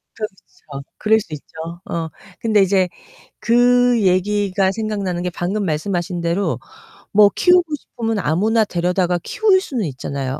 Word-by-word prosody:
그렇죠. 170 Hz, -9 st, -9 dB
그럴 220 Hz, +1 st, +3 dB
수 160 Hz, -7 st, -9 dB
있죠. 150 Hz, -, -8 dB, 0.4 s
어. 165 Hz, -1 st, -3 dB, 0.3 s
근데 215 Hz, -3 st, +3 dB
이제 190 Hz, -1 st, +2 dB, 0.5 s
그 245 Hz, 0 st, +3 dB
얘기가 195 Hz, 0 st, +1 dB
생각나는 200 Hz, -5 st, -3 dB
게 180 Hz, -, -1 dB
방금 190 Hz, +4 st, -2 dB
말씀하신 175 Hz, +2 st, -2 dB
대로 170 Hz, +4 st, -1 dB, 0.5 s
뭐 205 Hz, 0 st, +6 dB
키우고 360 Hz, 0 st, +5 dB
싶으면 225 Hz, -6 st, -4 dB
아무나 215 Hz, +8 st, +2 dB
데려다가 180 Hz, -1 st, 0 dB
키울 400 Hz, -3 st, +2 dB
수는 245 Hz, -, -3 dB
있잖아요. 135 Hz, 0 st, -4 dB
195 Hz, 300 characters per minute, -19 LUFS, 175-220 Hz, 0.5 s, 뭐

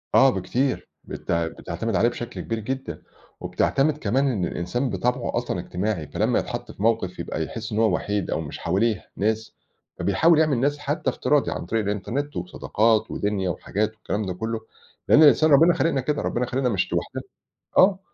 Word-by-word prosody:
آه، 135 Hz, -, +7 dB
بكتير. 130 Hz, +1 st, -1 dB, 0.2 s
بتع 85 Hz, -1 st, -2 dB
بتعتمد 100 Hz, +7 st, -4 dB
عليه 120 Hz, -, +4 dB
بشكل 120 Hz, 0 st, -6 dB
كبير 115 Hz, -1 st, -3 dB
جدًا 110 Hz, -8 st, -5 dB, 0.4 s
وبتعتمد 145 Hz, +2 st, +1 dB
كمان 135 Hz, +3 st, +1 dB
إن 95 Hz, -6 st, -1 dB
الإنسان 120 Hz, +12 st, -2 dB
بطبعه 125 Hz, +1 st, -1 dB
أصلًا -, -, -2 dB
اجتماعي، 90 Hz, -4 st, -3 dB
فلمّا -, -, +1 dB
يتحَط -, -, -5 dB
في 100 Hz, -, -8 dB
موقِف 110 Hz, -5 st, +1 dB
يبقى 80 Hz, -, -3 dB
يحِس 115 Hz, +6 st, -6 dB
إن 105 Hz, -, -1 dB
هو 110 Hz, -5 st, +3 dB
وحيد 105 Hz, -2 st, -2 dB
أو -, -, 0 dB
مش 75 Hz, -, -7 dB
حواليه 100 Hz, +4 st, 0 dB
ناس، 110 Hz, +2 st, -1 dB, 0.4 s
فبيحاول 165 Hz, -1 st, +4 dB
يعمل 155 Hz, -5 st, +3 dB
ناس 145 Hz, +2 st, +1 dB
حتّى 145 Hz, -, -1 dB
افتراضي -, -, +1 dB
عن -, -, -4 dB
طريق 110 Hz, +4 st, 0 dB
الإنترنت 105 Hz, +9 st, -3 dB
وصداقات 110 Hz, -, +1 dB
ودِنيا 100 Hz, -3 st, -1 dB
وحاجات 105 Hz, +5 st, -1 dB
والكلام 105 Hz, -1 st, -3 dB
ده 90 Hz, -, -3 dB
كُلّه، 110 Hz, +4 st, -3 dB, 0.5 s
لإن 155 Hz, -, +7 dB
الإنسان 155 Hz, +1 st, +6 dB
ربِّنا 165 Hz, +5 st, +7 dB
خالقنا 150 Hz, -5 st, +1 dB
كده، 145 Hz, +2 st, -1 dB
ربِّنا 125 Hz, +1 st, -1 dB
خالقنا 125 Hz, +1 st, 0 dB
مش 95 Hz, -5 st, -1 dB
لوحدنا. -, -, -2 dB, 0.6 s
آه. 190 Hz, 0 st, +6 dB
115 Hz, 170 wpm, -24 LUFS, 100-135 Hz, 0.6 s, آه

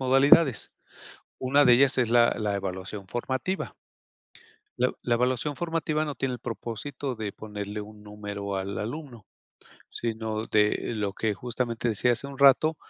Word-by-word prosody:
modalidades, 135 Hz, 0 st, +5 dB, 0.7 s
una 140 Hz, +3 st, +3 dB
de 120 Hz, -, +8 dB
ellas 135 Hz, +2 st, +4 dB
es 120 Hz, -3 st, +2 dB
la 120 Hz, 0 st, +5 dB
la 105 Hz, -2 st, 0 dB
evaluación 95 Hz, +1 st, -5 dB
formativa. 130 Hz, -, -3 dB, 1.0 s
La 125 Hz, -, +2 dB
la 120 Hz, -, +1 dB
evaluación 130 Hz, +3 st, 0 dB
formativa 165 Hz, -2 st, -1 dB
no 145 Hz, -2 st, -4 dB
tiene 130 Hz, 0 st, -2 dB
el -, -, -7 dB
propósito 120 Hz, +3 st, -5 dB
de 105 Hz, -2 st, -4 dB
ponerle 105 Hz, -1 st, -6 dB
un 105 Hz, 0 st, -11 dB
número 105 Hz, -1 st, -5 dB
al 95 Hz, +1 st, -3 dB
alumno, 120 Hz, -2 st, -6 dB, 0.6 s
sino 110 Hz, -1 st, -3 dB
de 105 Hz, +2 st, +1 dB
lo 105 Hz, -2 st, -2 dB
que 110 Hz, 0 st, -1 dB
justamente 120 Hz, +2 st, -2 dB
decía 120 Hz, +3 st, +2 dB
hace 140 Hz, +4 st, -3 dB
un 140 Hz, -, -10 dB
rato, 140 Hz, +3 st, +5 dB
120 Hz, 150 wpm, -27 LUFS, 105-135 Hz, 1.0 s, de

